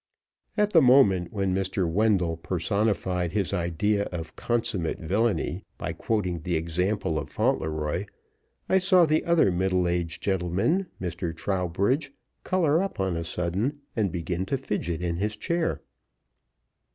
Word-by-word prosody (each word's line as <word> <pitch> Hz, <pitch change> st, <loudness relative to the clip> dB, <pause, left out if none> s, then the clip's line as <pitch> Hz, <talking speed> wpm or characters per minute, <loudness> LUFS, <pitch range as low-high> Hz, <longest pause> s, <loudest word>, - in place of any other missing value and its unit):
At 210 Hz, 0 st, +2 dB
the 165 Hz, -, +7 dB
moment 105 Hz, -, +5 dB
when 95 Hz, -3 st, 0 dB
Mr. 95 Hz, -1 st, 0 dB
Wendell 90 Hz, -2 st, +2 dB
personified 90 Hz, 0 st, -1 dB
his 100 Hz, -2 st, 0 dB
idea 100 Hz, +4 st, 0 dB
of 85 Hz, -2 st, -6 dB
consummate 110 Hz, -8 st, -1 dB
villainy 95 Hz, -1 st, 0 dB
by 85 Hz, -1 st, -4 dB
quoting 90 Hz, -2 st, -1 dB
the 85 Hz, +2 st, -2 dB
example 85 Hz, +1 st, 0 dB
of -, -, -6 dB
Fauntleroy, 80 Hz, +4 st, -1 dB, 0.6 s
I 190 Hz, -, +4 dB
saw 185 Hz, -2 st, +5 dB
the 155 Hz, 0 st, +2 dB
other 170 Hz, -, +4 dB
middle 90 Hz, 0 st, +1 dB
aged 85 Hz, -1 st, -2 dB
gentleman 95 Hz, -, +1 dB
Mr. 85 Hz, -2 st, -4 dB
Trowbridge 100 Hz, -, 0 dB, 0.3 s
color 170 Hz, -3 st, +2 dB
up 195 Hz, -, -4 dB
on 95 Hz, -2 st, 0 dB
a 85 Hz, -, -2 dB
sudden, 95 Hz, -, -2 dB
and 105 Hz, -5 st, +1 dB
begin 90 Hz, +2 st, -3 dB
to 135 Hz, -, 0 dB
fidget 90 Hz, -9 st, -3 dB
in 85 Hz, -1 st, -1 dB
his 105 Hz, +3 st, -1 dB
chair. 170 Hz, +9 st, -1 dB
95 Hz, 140 wpm, -26 LUFS, 85-110 Hz, 0.6 s, the